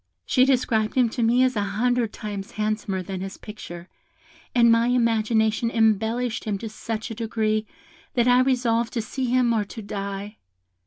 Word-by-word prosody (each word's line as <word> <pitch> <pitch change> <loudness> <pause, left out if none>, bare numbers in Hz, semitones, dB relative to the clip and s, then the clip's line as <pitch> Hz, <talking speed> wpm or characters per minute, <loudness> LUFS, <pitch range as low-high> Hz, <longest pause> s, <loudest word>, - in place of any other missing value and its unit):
She 255 -1 +4
described 235 -5 +1
him 250 -3 +4
to 240 - -4
me 235 +3 +4
as 255 -1 +2
an 210 - +1
hundred 230 +3 0
times 205 -2 -6
handsomer 210 -3 -2
than 185 0 -5
his 195 +1 -6
picture, 175 -5 -9 0.7
and 235 -1 +6
my 230 +1 +4
imagination 225 -2 +2
embellished 225 +1 +1
him 210 -2 -1
to 225 +2 -6
such 220 +1 -5
a - - -3
degree 215 -1 -1 0.5
that 240 -1 +3
I 250 0 +6
resolved 240 -3 +1
to 230 - 0
see 260 +4 -3
him 245 -1 +2
or 220 -2 +1
to 220 +2 -9
die. 200 +1 -5
225 Hz, 170 wpm, -24 LUFS, 210-240 Hz, 0.7 s, and